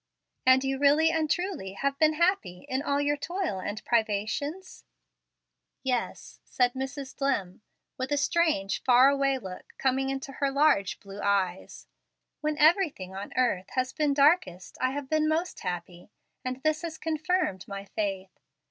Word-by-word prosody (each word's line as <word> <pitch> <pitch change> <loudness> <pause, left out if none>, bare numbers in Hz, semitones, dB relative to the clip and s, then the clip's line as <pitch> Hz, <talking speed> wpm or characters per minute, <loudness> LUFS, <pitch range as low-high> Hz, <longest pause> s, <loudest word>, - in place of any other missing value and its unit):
"And 260 +1 +6
you 270 0 -1
really 295 +3 +5
and 320 -2 0
truly 355 - -2
have 275 +7 -1
been 310 0 +4
happy 310 - 0
in 260 +1 -1
all 280 -1 0
your 290 0 +1
toil 345 - -3
and 205 +3 -5
privations?" 235 - -1 1.0
"Yes," 255 -3 -3
said 245 -1 +1
Mrs 265 0 -5
Dlimm, 230 -10 -1 0.4
with 260 +2 -3
a 290 - +2
strange, 290 - +1
far 255 +1 +6
away 275 -1 +1
look 190 -7 -9
coming 265 0 +1
into 270 0 -4
her 275 +1 -1
large 275 -9 +2
blue 200 0 -9
eyes; 190 -2 -1 0.5
"when 305 0 -1
everything 305 - +3
on 195 +1 -6
earth 215 -7 +1
has 255 0 0
been 295 -2 +1
darkest 280 - +2
I 255 - +3
have 280 +1 -4
been 310 +1 +1
most 330 +3 -1
happy, 175 0 -6 0.3
and 255 +1 -4
this 310 0 +1
has 330 -2 -5
confirmed 315 - -1
my 200 0 -6
faith. 195 -2 -4
270 Hz, 155 wpm, -28 LUFS, 200-305 Hz, 1.0 s, And